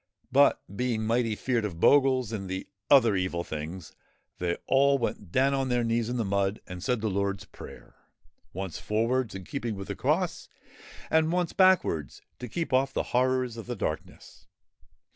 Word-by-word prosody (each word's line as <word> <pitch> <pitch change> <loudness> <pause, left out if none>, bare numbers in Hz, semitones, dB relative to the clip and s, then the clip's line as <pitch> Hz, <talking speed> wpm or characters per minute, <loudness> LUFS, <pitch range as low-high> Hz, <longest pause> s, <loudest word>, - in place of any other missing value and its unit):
But, - - +4
being 120 -1 -1
mighty 115 -1 +1
feared 120 0 -1
of 90 -6 -4
Bogles 130 -1 +4
and 95 -4 -5
the 95 0 -4 0.2
other 120 -7 +6
Evil 90 -2 -1
Things, 80 +3 -7 0.5
they 85 -1 -1
all 140 +1 +4
went 105 -7 -4
down 135 +4 +3
on 135 -1 0
their 120 -1 +1
knees 115 0 0
in 125 - -2
the 115 - 0
mud 100 +1 0
and 90 -1 -8
said 125 -1 0
the 110 - 0
Lord's 100 -1 -1
Prayer, - - -12 0.6
once 95 -1 -5
forwards, 115 +1 0
in 95 - -6
keeping 115 +1 -4
with 95 0 -8
the - - -3
cross, - - -1 0.6
and 160 0 +3
once 175 -1 0
backwards 185 - +2 0.2
to 125 - -6
keep 165 +2 -3
off 135 +1 +3
the - - -2
Horrors 125 -1 +1
of 115 - -8
the 120 - -3
Darkness. 80 - -6
115 Hz, 175 wpm, -28 LUFS, 95-130 Hz, 0.6 s, other